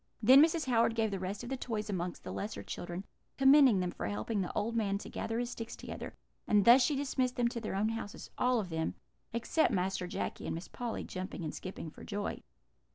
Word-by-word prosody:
"Then 255 +5 +8
Mrs. 325 0 +2
Howard 230 -2 +3
gave 220 -2 +1
the 195 - -2
rest 190 +4 -4
of 240 - -6
the 270 - -1
toys 225 -4 -3
among 180 -3 -2
the - - -6
lesser 205 +2 -4
children, 175 +2 -5 0.3
commending 270 -5 +7
them 180 -1 -1
for - - -4
helping 105 - -1
the 180 - -3
old 220 +2 -1
man 200 -3 +1
to - - -9
gather 225 - -3
his 240 0 -2
sticks 230 -1 -6
together; - - -7 0.3
and 205 -2 +4
thus 240 +3 +9
she 295 - +2
dismissed 260 -2 0
them 240 -1 +2
to 235 -1 -5
their 215 - -3
own 210 +3 +1
houses, 225 -2 -6
all 250 -1 +2
of 195 -4 -4
them, 160 -1 -2 0.4
except 235 +7 +1
Master 185 -1 0
Jacky - - -4
and - - -2
Miss 170 - -6
Polly, 240 -2 -4
jumping 185 -1 -5
and 155 - -3
skipping 185 -4 -6
for - - -13
joy." 205 -1 -3
220 Hz, 225 wpm, -32 LUFS, 190-245 Hz, 0.4 s, thus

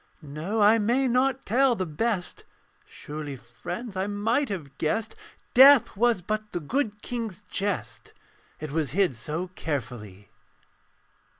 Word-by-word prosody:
No: 155 +9 -4
I 215 +2 +6
may 245 +5 +2
not 260 +2 +1
tell 255 +3 +3
the 185 - -2
best; 180 +4 -2 0.4
Surely, 150 -1 -7
friends, 175 - -7
I 190 +1 -1
might 225 +7 0
have 145 -9 -6
guessed 220 +8 -1 0.4
Death 265 -2 +8
was 230 -3 +2
but 215 +2 -3
the - - -1
good 210 - -2
King's 225 -7 -5
jest, 200 -1 -3 0.5
It 155 -2 -6
was 150 -4 -1
hid 190 -10 +3
so 155 +10 -4
carefully. 115 - -6
200 Hz, 130 wpm, -26 LUFS, 150-230 Hz, 0.5 s, Death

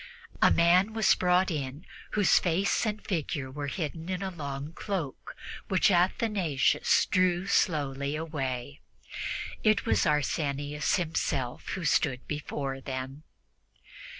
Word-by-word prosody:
A - - +7
man 180 +5 +4
was 220 -3 +4
brought 180 +1 +2
in 145 +1 -4 0.3
whose 205 -2 +5
face 190 +6 +1
and 210 0 -4
figure 145 -7 -2
were 145 +1 -4
hidden 160 +2 -4
in 185 0 -2
a 190 - -3
long 145 -2 -6
cloak, 175 -8 -5 0.3
which 190 +2 +3
Athanasius 175 - +2
drew 185 -1 +2
slowly 145 -6 0
away. 140 -3 -4 0.8
It 215 -1 +3
was 225 - +2
Arsenius 145 0 0
himself 150 -7 -2
who 180 - -4
stood 135 -3 +1
before 140 -2 -4
them! 130 +2 -5
155 Hz, 120 wpm, -29 LUFS, 140-185 Hz, 0.8 s, A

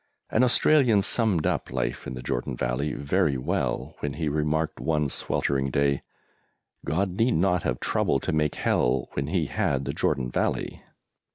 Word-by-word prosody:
An 110 - +3
Australian 125 -4 +4
summed 105 -7 +2
up - - -1
life 60 0 -2
in 65 - -5
the 60 - -7
Jordan - - -2
Valley 65 +5 -1
very 70 -1 +1
well, 65 - -2
when 75 -2 -3
he 80 0 -2
remarked 75 +1 -1
one 75 -3 0
sweltering 70 0 -1
day, 70 +1 +1 0.8
"God 95 +3 -1
need 120 +2 +3
not 90 +1 +2
have 65 -3 -2
troubled 70 - 0
to - - -1
make 75 -1 +1
Hell 60 - +1
when 70 0 -2
He 85 0 0
had 70 -1 -1
the 70 - -2
Jordan 65 -3 0
Valley." - - -1
75 Hz, 165 wpm, -26 LUFS, 65-90 Hz, 0.8 s, Australian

